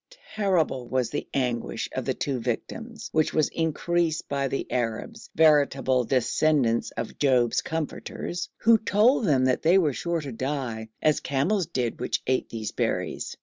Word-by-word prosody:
Terrible 175 - +1
was 125 -3 -1
the 145 - -3
anguish 125 -3 -1
of - - -4
the - - -1
two 135 -3 -2
victims, 225 - -5
which 155 -1 +1
was 155 - +3
increased 165 0 -1
by 140 -1 -1
the 135 - -2
Arabs, 125 - -3
veritable 140 -5 +3
descendants 130 -1 +2
of 115 0 -5
Job's 125 -5 +3
comforters, 170 +1 -4
who 230 0 +5
told 220 +4 +3
them 135 -6 +3
they 160 +8 +3
were 155 -7 +2
sure 170 +8 -2
to 140 -3 -6
die, 125 -3 -3
as 155 -1 +3
camels 155 +7 0
did 125 -8 -2
which - - -2
ate 130 0 0
these 110 -2 -4
berries. - - -2
145 Hz, 150 wpm, -26 LUFS, 125-170 Hz, -, who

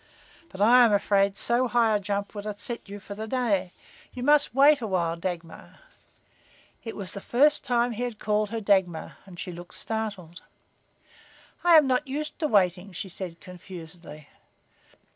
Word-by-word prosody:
"But 190 - -8
I 245 +3 +7
am 230 - +4
afraid 200 0 +2
so 240 +3 +1
high 230 -2 +2
a - - +1
jump 200 0 -3
would 205 0 -7
upset 210 +2 -6
you 205 +1 -7
for 200 +1 -9
the 215 +2 -6
day. 215 -7 0 0.4
You 250 - -5
must 290 -4 +4
wait 285 +1 +6
awhile, 180 -6 -1
Dagmar." 170 -1 -7 1.1
It 225 - -6
was 195 -3 -5
the 200 - -7
first 295 +8 +3
time 245 -2 +1
he 230 +1 -5
had 245 -3 -3
called 210 0 0
her 225 +1 -4
Dagmar, 190 -5 0
and 175 -2 -12
she 180 - -5
looked 175 +1 -9
startled. 200 -6 -5 1.2
"I 345 -2 +7
am 305 - +6
not 265 +2 0
used 300 +3 -4
to 315 - 0
waiting," 190 - +1
she 190 +2 -6
said, 175 -2 -6
confusedly. 170 -4 -11
205 Hz, 165 wpm, -26 LUFS, 185-240 Hz, 1.2 s, I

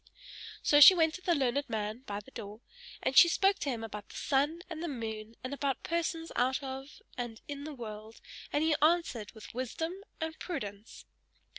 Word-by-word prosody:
So 290 0 +5
she 370 +6 +12
went 320 -2 +3
to 370 - -7
the 350 -2 +2
learned 280 0 0
man 215 +1 -2
by 205 0 -4
the 240 - -17
door, 215 -1 -8 0.4
and 270 - 0
she - - +10
spoke 390 +3 +3
to 285 - -2
him 235 -4 -3
about 210 -2 -7
the - - -12
sun 295 +5 0
and 330 -3 -6
the 345 - -2
moon, 225 -5 -5
and 255 +2 -4
about 280 -1 -2
persons 330 0 -2
out 260 +3 +1
of 270 +1 -7 0.2
and 235 -2 -4
in 285 0 -6
the 305 -1 -6
world, 220 -2 -8 0.3
and 295 - +1
he 320 -1 +3
answered 310 -9 +2
with 220 - -11
wisdom 260 +7 -3 0.3
and 320 0 -4
prudence. 210 - -6
270 Hz, 190 wpm, -31 LUFS, 225-320 Hz, 0.4 s, she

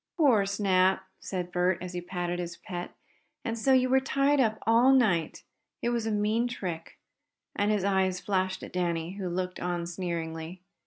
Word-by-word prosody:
"Poor 245 - +4
Snap!" 190 -1 +2 0.2
said 180 -2 -4
Bert, 180 0 +2
as 180 0 -7
he 175 - -3
patted 175 0 -3
his 170 -1 -5
pet 175 -3 -7 0.5
"And 230 -2 -1
so 230 +4 +1
you 255 -1 +5
were 265 +1 +4
tied 275 +2 +2
up 220 -4 +2
all 235 +4 +5
night? 195 - +2 0.4
It 235 - +2
was 235 -2 -1
a - - 0
mean 215 +3 +1
trick!" 180 -9 -6 0.6
and 205 +1 +1
his 210 -3 +1
eyes 190 -2 +1
flashed 190 -1 -1
at - - -9
Danny, 170 -2 -1
who 190 -3 -3
looked 180 +1 -3
on 175 -1 -2
sneeringly. 170 0 -5
190 Hz, 175 wpm, -28 LUFS, 175-225 Hz, 0.6 s, you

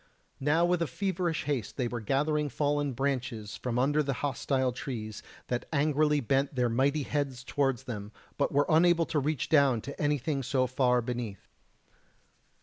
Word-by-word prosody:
Now 150 +5 +3
with 175 -3 +1
feverish 180 +1 -1
haste 135 -8 -3
they 125 -3 0
were 120 0 -4
gathering 150 +5 +1
fallen 145 -1 0
branches 125 -5 -2
from 125 -2 -3
under 145 +4 +3
the 140 -2 -1
hostile 130 -1 0
trees, 110 -4 -6 0.2
that 125 0 -3
angrily 150 0 +2
bent 135 +3 0
their 125 -1 +2
mighty 140 +5 +1
heads 135 -3 -2
towards 135 -3 0
them, 105 -5 -6 0.2
but 140 - 0
were 145 +1 +3
unable 170 +1 +4
to 155 - 0
reach 145 -1 -1
down 140 -6 +4
to 140 - -7
anything 145 -1 0
so 130 0 +1
far 125 -1 +2
beneath. 115 -5 -5
140 Hz, 155 wpm, -29 LUFS, 125-150 Hz, 0.2 s, unable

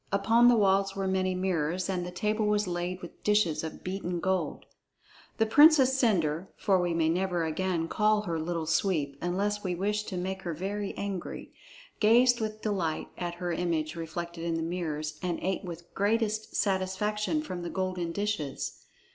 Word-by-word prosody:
Upon 225 +5 +4
the 245 - +7
walls 195 -1 +3
were 195 -1 -1
many 185 -1 +1
mirrors, 180 -1 -1
and 185 -2 -1
the 175 - -5
table 210 +4 0
was 210 0 +2
laid 180 0 -3
with 175 - -10
dishes 210 -8 +2
of 160 - -7
beaten 180 -2 -3
gold. 190 +1 -1 0.7
The 225 - +3
Princess 280 +1 +6
Cendre 185 - +1
(for 190 -4 +2
we 175 -1 0
may 165 -1 +2
never 175 +1 0
again 165 +1 -1
call 210 +2 +2
her 170 -5 -2
Little 165 0 -2
Sweep, 155 -3 0
unless 200 +4 -1
we 180 -2 -1
wish 210 +4 0
to 185 - -5
make 190 +1 -3
her 170 -3 -4
very 200 +4 -4
angry) 195 -3 -5 0.5
gazed 240 +2 +5
with 215 0 -4
delight 185 -7 -1
at 175 -1 -4
her 175 0 -3
image 165 -2 -1
reflected 170 +1 -5
in 170 -1 -1
the 165 - -1
mirrors 155 -3 -3
and 175 -2 -1
ate 190 +2 -1
with 170 -1 -9
greatest 215 +1 0
satisfaction 210 +8 0
from 180 - -5
the 175 - -4
golden 185 -2 -2
dishes. 200 -8 -3
185 Hz, 170 wpm, -29 LUFS, 170-210 Hz, 0.7 s, the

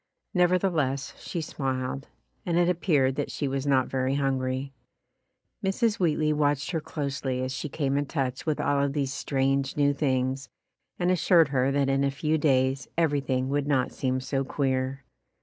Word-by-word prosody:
Never 180 -1 +4
theless 150 -8 -1
she 170 - -4
smiled, 135 -2 -3 0.4
and 170 -1 0
it 175 0 +4
appeared 150 -7 +2
that 145 - -1
she 145 - -2
was 135 +1 -2
not 130 -2 +3
very 130 0 0
hungry. 135 -1 -1 0.9
Mrs. 210 +3 +1
Wheatley 155 -3 +2
watched 145 -1 +1
her 165 -3 -1
closely 140 -4 -3
as 130 - -2
she 150 - -4
came 140 -1 0
in 145 - -2
touch 135 -3 -2
with 155 - 0
all 145 -1 +1
of 140 -1 0
these 140 -2 -1
strange 135 0 0
new 145 -1 +3
things 130 -1 -1 0.5
and 180 0 +1
assured 170 -3 +4
her 135 -1 +2
that 140 -1 +2
in 135 0 +2
a 140 - +2
few 155 +3 0
days 130 -2 +2
everything 140 -5 +1
would 145 0 0
not 135 -3 +1
seem 130 -1 -1
so 135 +1 -1
queer. 130 -1 -1
140 Hz, 170 wpm, -27 LUFS, 130-150 Hz, 0.9 s, Never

